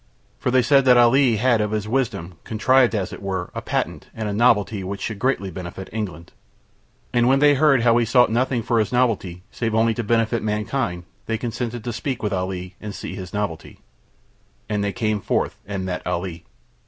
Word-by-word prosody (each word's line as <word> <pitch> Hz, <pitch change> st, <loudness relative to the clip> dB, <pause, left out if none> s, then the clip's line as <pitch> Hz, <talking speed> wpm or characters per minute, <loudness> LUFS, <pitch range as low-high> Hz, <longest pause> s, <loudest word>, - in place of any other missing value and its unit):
For -, -, -1 dB
they 130 Hz, 0 st, +4 dB
said 135 Hz, +3 st, +5 dB
that 125 Hz, -1 st, +6 dB
Ali 120 Hz, 0 st, +5 dB
had 120 Hz, 0 st, +2 dB
of 105 Hz, -, 0 dB
his 105 Hz, -1 st, -2 dB
wisdom 105 Hz, -9 st, -2 dB
contrived 125 Hz, +2 st, +3 dB
as 95 Hz, -3 st, -2 dB
it -, -, -9 dB
were 95 Hz, -3 st, -3 dB
a -, -, -4 dB
patent -, -, -3 dB
and 110 Hz, -1 st, -3 dB
a 105 Hz, -, -2 dB
novelty 105 Hz, -3 st, +2 dB
which 100 Hz, +2 st, -5 dB
should 110 Hz, -3 st, -4 dB
greatly 115 Hz, -7 st, 0 dB
benefit 90 Hz, +2 st, -8 dB
England. 90 Hz, -7 st, -5 dB, 0.8 s
And 120 Hz, 0 st, +3 dB
when 135 Hz, +1 st, +5 dB
they 145 Hz, +1 st, +5 dB
heard 140 Hz, -3 st, +4 dB
how 115 Hz, -1 st, +5 dB
he 120 Hz, -, +2 dB
sought 125 Hz, 0 st, +4 dB
nothing 120 Hz, 0 st, 0 dB
for 115 Hz, 0 st, +1 dB
his 105 Hz, -2 st, 0 dB
novelty 110 Hz, -8 st, 0 dB
save 115 Hz, -2 st, -2 dB
only 115 Hz, 0 st, +3 dB
to 120 Hz, -, -3 dB
benefit 115 Hz, +1 st, +1 dB
mankind 105 Hz, -3 st, -2 dB, 0.2 s
they 115 Hz, -, 0 dB
consented 120 Hz, 0 st, -4 dB
to 120 Hz, -1 st, -4 dB
speak 125 Hz, +1 st, -4 dB
with 105 Hz, -, -1 dB
Ali 90 Hz, -1 st, -3 dB
and 105 Hz, -2 st, -6 dB
see -, -, -6 dB
his 90 Hz, -3 st, -7 dB
novelty. 100 Hz, -6 st, -4 dB, 0.9 s
And 105 Hz, -1 st, -1 dB
they 100 Hz, -, 0 dB
came 110 Hz, -2 st, -1 dB
forth -, -, -1 dB
and 100 Hz, -2 st, -3 dB
met 90 Hz, -1 st, -3 dB
Ali. 90 Hz, -2 st, -3 dB
110 Hz, 200 wpm, -22 LUFS, 95-120 Hz, 0.9 s, that